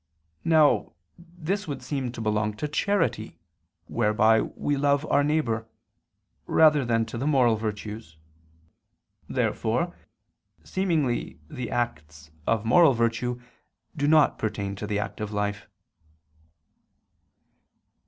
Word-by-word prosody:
Now 155 Hz, -3 st, +3 dB, 0.3 s
this 175 Hz, +3 st, -4 dB
would 140 Hz, -3 st, -5 dB
seem 135 Hz, -4 st, -3 dB
to 115 Hz, -, -6 dB
belong 105 Hz, -1 st, 0 dB
to 150 Hz, -, -3 dB
charity, 190 Hz, +4 st, -1 dB, 0.5 s
whereby 110 Hz, 0 st, +3 dB
we 145 Hz, -, -2 dB
love 140 Hz, +1 st, +1 dB
our 145 Hz, -, +4 dB
neighbor, 130 Hz, -7 st, 0 dB, 0.8 s
rather 150 Hz, -3 st, +5 dB
than 115 Hz, -2 st, +1 dB
to 115 Hz, +1 st, -6 dB
the 135 Hz, -, -1 dB
moral 125 Hz, -6 st, +4 dB
virtues. 105 Hz, -4 st, -6 dB, 1.1 s
Therefore -, -, -1 dB, 0.7 s
seemingly 160 Hz, -10 st, -1 dB
the 125 Hz, -6 st, -5 dB
acts 80 Hz, -11 st, -4 dB, 0.2 s
of 110 Hz, -1 st, +1 dB
moral 140 Hz, +5 st, +6 dB
virtue 120 Hz, +1 st, -1 dB, 0.6 s
do 145 Hz, -2 st, 0 dB
not 155 Hz, -1 st, +4 dB
pertain 100 Hz, -2 st, -3 dB
to 105 Hz, -, -5 dB
the 105 Hz, -1 st, -1 dB
active 105 Hz, +1 st, -4 dB
life. 105 Hz, 0 st, -3 dB
120 Hz, 110 wpm, -26 LUFS, 105-150 Hz, 1.1 s, moral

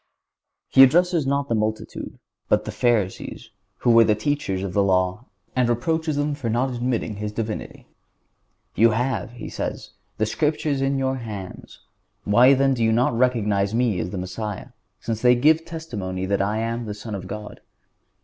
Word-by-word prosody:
He 135 Hz, -, +5 dB
addresses 165 Hz, +2 st, +5 dB
not 140 Hz, 0 st, 0 dB
the 115 Hz, -, -1 dB
multitude, 110 Hz, 0 st, -3 dB, 0.3 s
but -, -, +2 dB
the -, -, -4 dB
Pharisees, 110 Hz, -6 st, -1 dB, 0.3 s
who 120 Hz, -, +3 dB
were 115 Hz, 0 st, +7 dB
the 110 Hz, -1 st, +3 dB
teachers 105 Hz, -6 st, -2 dB
of 95 Hz, -2 st, -4 dB
the 100 Hz, -, +3 dB
law, 95 Hz, +3 st, +1 dB, 0.3 s
and 125 Hz, -2 st, +2 dB
reproaches 155 Hz, +6 st, 0 dB
them 145 Hz, +1 st, 0 dB
for 140 Hz, -5 st, -4 dB
not 125 Hz, +4 st, 0 dB
admitting 120 Hz, -3 st, -2 dB
His 105 Hz, 0 st, -4 dB
Divinity. 110 Hz, 0 st, -5 dB, 0.9 s
"You 115 Hz, +1 st, +5 dB
have," 120 Hz, -3 st, -2 dB
He 120 Hz, -, -8 dB
says, -, -, -5 dB, 0.3 s
"the 110 Hz, -, +1 dB
Scriptures 150 Hz, +3 st, -1 dB
in 135 Hz, 0 st, +1 dB
your 135 Hz, 0 st, 0 dB
hands; 105 Hz, -6 st, -8 dB, 0.4 s
why 125 Hz, +6 st, +6 dB
then 135 Hz, 0 st, +3 dB
do 120 Hz, -3 st, -1 dB
you 110 Hz, -, +3 dB
not 120 Hz, +1 st, +2 dB
recognize 105 Hz, -5 st, +1 dB
Me 115 Hz, -6 st, +1 dB
as 85 Hz, -, -3 dB
the 95 Hz, -, -5 dB
Messiah, 95 Hz, +3 st, -5 dB, 0.3 s
since 115 Hz, -1 st, -4 dB
they 125 Hz, 0 st, +5 dB
give 155 Hz, +6 st, +3 dB
testimony 105 Hz, -, -5 dB
that 100 Hz, +1 st, 0 dB
I 105 Hz, +2 st, 0 dB
am 115 Hz, +1 st, -2 dB
the 105 Hz, -, -4 dB
Son 105 Hz, +1 st, -8 dB
of 95 Hz, -2 st, -5 dB
God?" 105 Hz, +1 st, -8 dB
115 Hz, 175 wpm, -23 LUFS, 105-135 Hz, 0.9 s, were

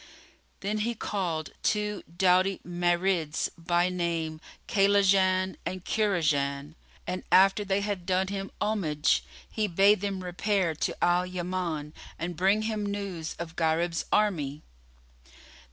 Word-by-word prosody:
Then 210 Hz, +2 st, -1 dB
he 235 Hz, +2 st, -1 dB
called 175 Hz, -7 st, -3 dB
two 210 Hz, -1 st, 0 dB, 0.2 s
doughty 185 Hz, +1 st, +3 dB
Marids, 175 Hz, -2 st, 0 dB
by 175 Hz, +1 st, +1 dB
name 165 Hz, -3 st, -2 dB, 0.3 s
Kaylaján 195 Hz, -2 st, +3 dB
and 185 Hz, -1 st, -5 dB
Kúraján, 150 Hz, -8 st, 0 dB, 0.3 s
and 180 Hz, +1 st, -4 dB
after 195 Hz, +2 st, +5 dB
they 195 Hz, 0 st, 0 dB
had 200 Hz, -3 st, -3 dB
done 190 Hz, 0 st, +1 dB
him 195 Hz, 0 st, -4 dB
homage, 170 Hz, -8 st, +1 dB, 0.2 s
he 215 Hz, -1 st, -1 dB
bade 195 Hz, +2 st, +4 dB
them 195 Hz, -2 st, -3 dB
repair 180 Hz, -1 st, 0 dB
to 155 Hz, -, -3 dB
Al 175 Hz, +1 st, +3 dB
Yaman 175 Hz, -4 st, -3 dB, 0.2 s
and 175 Hz, +1 st, -4 dB
bring 195 Hz, +5 st, +2 dB
him 215 Hz, -1 st, -2 dB
news 200 Hz, -5 st, -4 dB
of 170 Hz, -1 st, -7 dB
Gharib's 165 Hz, +1 st, 0 dB
army. 155 Hz, -9 st, +1 dB
185 Hz, 120 wpm, -28 LUFS, 170-200 Hz, 0.3 s, after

